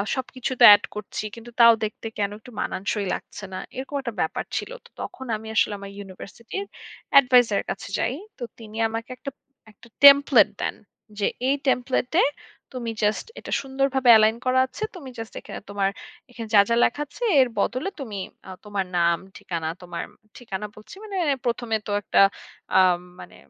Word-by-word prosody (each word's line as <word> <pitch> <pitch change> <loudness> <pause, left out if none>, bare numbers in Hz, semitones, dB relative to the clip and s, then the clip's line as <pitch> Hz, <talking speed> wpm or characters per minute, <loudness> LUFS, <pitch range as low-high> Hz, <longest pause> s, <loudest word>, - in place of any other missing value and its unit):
সবকিছু 260 -1 -4
তো - - +6
অ্যাড 205 -1 +8
করছি। 210 0 -5
কিন্তু 230 +1 -11
তাও 235 0 +9
দেখতে 215 +1 -4
কেন 200 -1 0
একটু 250 - -14
মানানসই 200 +1 -2
লাগছে 210 - -7
না। - - -4 0.2
এরকম 270 +3 -6
একটা 235 -3 -5
ব্যাপার 160 - -1
ছিল। - - -4
তো - - -16
তখন 260 - -7
আমি 220 +1 -8
আসলে 215 - +3
আমার 200 0 -9
ইউনিভার্সিটির 205 - -8 0.5
Adviser 250 -5 +4
এর - - -4
কাছে - - -6
যাই। - - 0 0.2
তো 250 - -7 0.2
তিনি 220 -1 -10
আমাকে 225 +1 -5
একটা, - - -6 0.4
একটা 235 - -19 0.2
টেমপ্লেট 280 -5 +8
দেন। - - -2 0.4
যে 200 - +1 0.2
এই 275 - +3
টেমপ্লেট 250 0 +1
এ - - +5 0.5
তুমি 235 -2 -4
জাস্ট 210 +1 +1
এটা - - -9
সুন্দরভাবে 265 -1 0
Align 220 +1 +3
করা 255 0 +3
আছে। 255 +11 -8
তুমি 280 -7 -9
জাস্ট 225 0 -7
এখানে - - -8
তোমার 200 -1 0 0.4
এখানে 235 -2 -8
যা, 205 - +8
যা 230 - +3
লেখা 290 +5 +1
আছে 485 - -9 0.2
এর 255 - +4
বদলে 255 - 0
তুমি 225 -7 -6 0.3
আ - - -9 0.2
তোমার 205 -2 -2
নাম, 170 0 +3 0.2
ঠিকানা, 165 -3 -4
তোমার 175 -1 -6 0.3
ঠিকানা 210 -4 -6
বলছি, 215 - -13
মানে 410 -3 -5 0.3
প্রথমে 235 -1 -1
তো - - -3
একটা - - +1 0.6
আ - - +8 0.4
মানে - - -13
230 Hz, 175 wpm, -24 LUFS, 205-255 Hz, 0.6 s, তাও